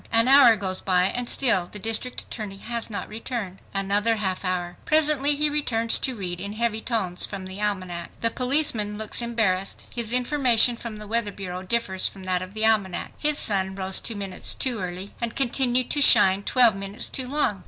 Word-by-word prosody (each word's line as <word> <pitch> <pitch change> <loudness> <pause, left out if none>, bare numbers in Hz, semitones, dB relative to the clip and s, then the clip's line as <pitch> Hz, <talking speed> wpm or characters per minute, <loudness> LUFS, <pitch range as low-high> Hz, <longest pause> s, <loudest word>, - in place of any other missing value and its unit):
An 230 +1 +4
hour 265 -4 +7
goes 190 -2 -1
by, 180 -1 +2
and 240 +6 -2
still 200 -10 +3
the - - -5
district 225 +4 0
attorney 210 -4 -8
has 235 +3 -4
not 205 - -5
returned. 215 -4 -6
Another 200 +3 +1
half 190 -3 -3
hour! 180 -1 -3
Presently 295 -2 +2
he 300 +1 +2
returns 235 -6 +1
to 260 -2 -1
read 180 -4 -5
in 200 +2 -6
heavy 220 0 -1
tones 195 -8 -1
from 195 -2 -3
the 190 +2 -8
almanac. 185 -4 -3
The 230 - +1
policeman 250 -6 +1
looks 220 +2 -1
embarrassed. 215 -5 -1
His 235 -2 -1
information 250 -2 +3
from 230 -2 -8
the 210 - -9
weather 225 0 -1
bureau 185 -2 -7
differs 190 -1 0
from 195 - -10
that 185 -1 -1
of 185 +3 -9
the 220 0 +1
almanac. 205 -5 0
His 300 -1 +3
sun 190 -5 +1
rose 190 -1 +1
two 230 - -3
minutes 195 -2 -3
too 250 -4 -1
early 185 +2 -6
and 235 -1 -3
continued 255 -1 +1
to 290 - +2
shine 190 -7 +6
twelve 235 0 +4
minutes 195 +1 -4
too 260 -1 -3
long! 265 -8 0
215 Hz, 195 wpm, -24 LUFS, 190-240 Hz, -, hour